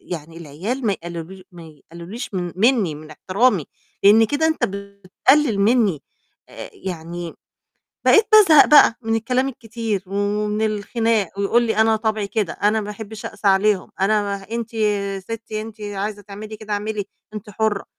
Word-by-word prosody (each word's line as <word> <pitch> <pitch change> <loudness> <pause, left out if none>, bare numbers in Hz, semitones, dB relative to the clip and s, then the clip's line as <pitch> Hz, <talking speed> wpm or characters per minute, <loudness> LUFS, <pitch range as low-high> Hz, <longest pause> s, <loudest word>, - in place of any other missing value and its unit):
يعني 165 -1 -8
العيال 185 - -4
ما 205 - +2
يقلّلوش 170 +1 -7
ما 175 - -12
يقلّلوليش 170 - -9
من 175 -2 -3
منّي 215 - +2
من 155 +1 -12
احترامي، 190 - +1 0.4
لإن 220 +3 +7
كده 290 +6 0
أنت 315 - 0
بتقلِّل 200 +6 0
منّي." 205 - +2 0.5
آآ - - -9
يعني 170 -2 -7 0.7
بقيت 435 0 +6
بازهق 380 -9 +8
بقى 290 -6 +6
من 225 0 -1
الكلام 255 +4 0
الكتير 225 -5 -4
ومن 210 +2 -1
الخناق 215 -1 -1
ويقول 215 +4 +2
لي 225 -2 -1
"أنا 220 0 +4
طَبعي 215 -1 -1
كده، 205 -5 -1
أنا 210 +2 +1
ما 210 - -6
أحبّش 215 0 -9
أقسى 210 -1 -2
عليهم، 195 0 +2
أنا 210 +2 +2
ما 200 -1 -2
ه - - -17
أنتِ 230 0 -4
يا 200 -3 -1
ستّي 220 +1 -6
أنتِ 220 0 -10
عايزة 205 0 -4
تعملي 210 +2 -9
كده 215 -1 -7
اعملي 205 0 -2 0.3
أنتِ 210 0 -8
حُرّة." 210 -1 -1
210 Hz, 160 wpm, -21 LUFS, 195-225 Hz, 0.7 s, بازهق